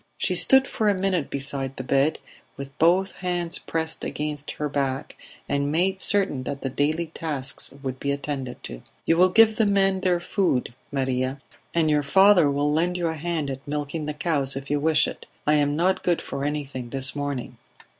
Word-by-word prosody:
She - - +1
stood 265 0 +5
for 215 -1 0
a 200 - +1
minute 185 -5 0
beside 135 -1 -1
the 130 - -4
bed, 140 +4 +2 0.4
with 140 0 -8
both 180 +4 +3
hands 175 -2 -2
pressed 160 0 -3
against 150 -1 -4
her 150 - -3
back, 135 -1 -2 0.3
and 140 0 0
made 190 +4 +1
certain 195 -10 +2
that 140 +2 -5
the 135 - -2
daily 155 +4 0
tasks 140 -4 -2
would 130 -1 -4
be 140 - -1
attended 140 -3 -4
to. - - -7 0.2
"You 165 - +3
will 185 +1 +6
give 220 +2 +5
the 220 - +3
men 195 -1 +2
their 180 -2 +1
food, 175 - 0 0.2
Maria, 130 0 -1 0.4
and 165 -2 +3
your 150 -1 +3
father 185 +2 +5
will 145 +1 +1
lend 175 +3 +1
you 170 -2 0
a - - -2
hand 160 -2 -2
at 135 +2 -8
milking 150 +1 -3
the 150 - -3
cows 145 -4 0
if 135 +1 -6
you 145 - +2
wish 155 +1 +3
it. - - -8 0.2
I 150 - +3
am 145 -1 +2
not 180 +4 +1
good 175 -2 +2
for 140 +1 -4
anything 140 -4 -4
this 135 +2 -1
morning." 145 -3 -4
150 Hz, 195 wpm, -24 LUFS, 140-175 Hz, 0.4 s, will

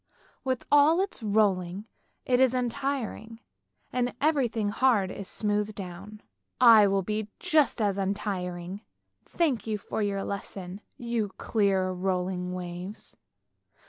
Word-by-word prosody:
" - - -29
With 260 -2 -2
all 290 +4 +6
its 390 -8 -2
rolling, 200 -3 +1 0.4
it 250 -1 +2
is 260 -1 +4
untiring, 245 -3 -3 0.5
and 245 -1 0
everything 250 -8 +1
hard 210 -4 +2
is 200 - -7
smoothed 210 0 -1
down. 195 +3 -8 0.4
I 225 -4 +8
will 195 0 +1
be 215 +2 -3
just 315 -7 +2
as 200 -2 +1
untiring! 190 -2 -3 0.4
Thank 265 - 0
you 215 -1 -1
for 210 - -4
your 200 -1 -1
lesson, 195 -1 -6 0.2
you 235 -3 -2
clear 195 -4 +1
rolling 180 0 -2
waves! 180 +2 -7
210 Hz, 125 wpm, -28 LUFS, 190-245 Hz, 0.5 s, I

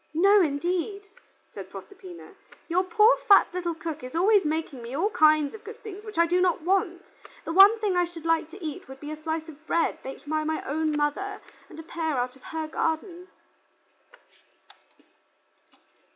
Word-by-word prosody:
"No, 395 +5 +5
indeed," 360 +6 -2 0.5
said - - -9
Proserpina. 375 -3 -12 0.3
"Your 355 +2 +1
poor 430 +5 +5
fat 400 - +7
little 350 -2 -3
cook 315 -2 -6
is 255 +4 -8
always 395 +4 +4
making 305 -4 -3
me 235 +3 -7
all 390 +9 0
kinds 310 -7 +4
of 440 - -11
good 440 +2 -10
things 415 -1 -9
which 430 -4 -10
I 335 - +5
do 355 +2 +1
not 360 -3 +1
want. 360 0 0 0.4
The 330 - -3
one 395 +5 +8
thing 420 -4 -1
I 355 0 +3
should 335 -2 -11
like 330 -1 +1
to 360 +1 -10
eat 300 -2 -6
would 265 0 -11
be 295 +1 -7
a 310 0 -8
slice 320 0 -3
of 310 -1 -13
bread 335 -1 0
baked 270 +2 -9
by 310 +1 -1
my 315 0 -2
own 305 +1 -1
mother, 385 +8 -2 0.3
and - - -13
a - - -8
pear 320 -3 -3
out 250 +1 -2
of 265 - -20
her 320 -1 -4
garden." 335 +3 -3
335 Hz, 180 wpm, -26 LUFS, 310-385 Hz, 0.5 s, one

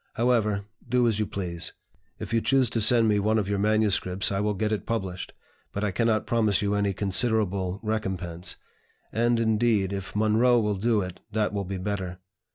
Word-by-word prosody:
However, 110 -4 +1 0.2
do 125 0 +3
as 110 -2 +1
you 105 - 0
please. 85 -4 -2 0.4
If - - -6
you 115 - +3
choose 130 -2 +2
to 115 - +1
send 115 +1 +5
me 105 -1 +3
one 110 +2 +1
of 105 -3 0
your 100 -1 -1
manuscripts 105 -3 +2
I 95 - -1
will 105 0 0
get 105 +2 -1
it 105 -3 -3
published, 95 -6 -3 0.4
but 100 - -4
I 105 - 0
cannot 110 +3 +1
promise 110 -4 +2
you 100 0 0
any 100 -1 +1
considerable 100 -2 0
recompense; 95 -5 -3 0.6
and, 120 +1 +1
indeed, 110 -3 +1
if 95 0 -6
Munroe 110 +3 +3
will 105 -2 0
do 110 +1 +1
it, 90 -1 -6
that 105 -1 0
will 100 -1 -2
be 95 +1 -4
better. 95 -1 -4
105 Hz, 185 wpm, -26 LUFS, 95-110 Hz, 0.6 s, send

